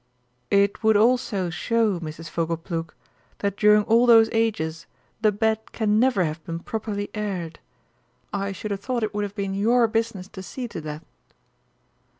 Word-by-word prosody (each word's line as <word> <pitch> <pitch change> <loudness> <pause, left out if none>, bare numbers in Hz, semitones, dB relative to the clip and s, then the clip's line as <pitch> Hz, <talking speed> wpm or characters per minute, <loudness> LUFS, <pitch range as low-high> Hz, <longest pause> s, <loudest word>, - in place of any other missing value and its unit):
"It 200 0 +2
would 220 -2 +4
also 215 -5 +2
show, 215 +3 +1
Mrs. 165 0 -7
Fogleplug, 165 0 -3 0.5
that 200 -1 -2
during 210 0 +5
all 230 +3 +4
those 225 -1 +7
ages 185 -9 -1 0.3
the 215 -1 +4
bed 220 +1 -1
can 215 -1 +2
never 245 -6 +3
have 155 0 -4
been 165 -1 -5
properly 205 +2 -4
aired. 190 -6 -4 0.7
I 200 0 -1
should 205 +2 -6
have 200 - -2
thought 240 +2 -2
it 215 - -2
would 205 0 -1
have 200 0 -8
been 195 -1 -2
your 230 +4 +3
business 225 -4 -2
to 195 -3 -9
see 245 +6 -6
to 170 - -6
that." 150 +1 -7
205 Hz, 160 wpm, -24 LUFS, 175-225 Hz, 0.7 s, those